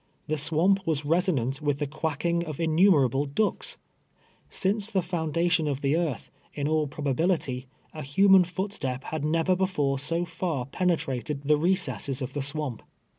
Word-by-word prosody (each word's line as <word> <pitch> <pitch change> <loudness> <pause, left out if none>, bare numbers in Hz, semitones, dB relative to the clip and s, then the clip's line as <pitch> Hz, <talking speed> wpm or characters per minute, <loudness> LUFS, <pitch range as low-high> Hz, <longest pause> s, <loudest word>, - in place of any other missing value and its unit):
The 155 - -1
swamp 175 +6 +2
was 150 -3 0
resonant 150 - +1
with 145 -2 0
the 145 - -1
quacking 160 +3 -1
of 155 -4 -6
innu 165 +3 +3
merable 140 - +3
ducks! 210 +9 -1 0.7
Since 200 +2 0
the 195 -5 0
foundation 165 -1 0
of 140 -1 -2
the 140 +2 +2
earth, 160 -9 -2 0.2
in 145 -1 -1
all 155 -1 +1
probability, 140 -2 -1 0.3
a 155 - -6
human 190 +7 +5
footstep 175 -8 -4
had 155 -2 -4
never 165 +4 +2
before 150 -8 0
so 165 +5 -1
far 165 -6 -3
penetrated 145 -3 -1
the 150 +2 +4
recesses 150 -5 -1
of 130 0 -5
the 145 - -2
swamp. 140 -3 -3
155 Hz, 155 wpm, -27 LUFS, 140-175 Hz, 0.7 s, human